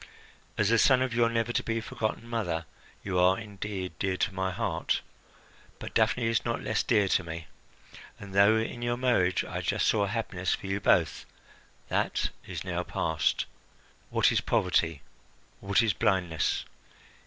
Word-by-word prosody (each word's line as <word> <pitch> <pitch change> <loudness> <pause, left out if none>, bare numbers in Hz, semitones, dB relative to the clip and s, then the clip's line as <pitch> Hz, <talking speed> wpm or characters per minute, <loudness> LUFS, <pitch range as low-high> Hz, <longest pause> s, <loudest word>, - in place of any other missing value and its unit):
As 105 -1 +2
the 115 0 +4
son 130 +1 +5
of 130 -2 -2
your 115 0 +3
never 115 +1 -1
to - - +1
be 115 0 -2
forgotten 115 +1 -3
mother, 90 -9 -2 0.4
you 95 -2 -1
are 90 +1 +5
indeed 100 -4 -5
dear 95 -1 0
to 100 - 0
my 95 0 -1
heart; 90 - -1 0.8
but - - -8
Daphne 115 +2 +2
is 115 0 +1
not 115 -1 -1
less 110 - +1
dear 105 -4 +2
to 90 - +2
me, 85 0 -6 0.7
and 100 -1 -10
though 100 +3 +5
in 115 +2 -3
your 120 0 0
marriage 120 -8 +2
I - - -4
just - - 0
saw 100 -2 +2
happiness 100 -4 -1
for - - -12
you 95 +1 -1
both, 80 -5 +2 0.6
that - - 0 0.2
is - - -5
now - - -2
past. 80 0 0 0.6
What - - +3
is - - +2
poverty, 80 -5 +1 0.6
what 100 +3 +2
is 110 -4 +2
blindness! 90 -6 0
100 Hz, 165 wpm, -29 LUFS, 90-115 Hz, 0.8 s, son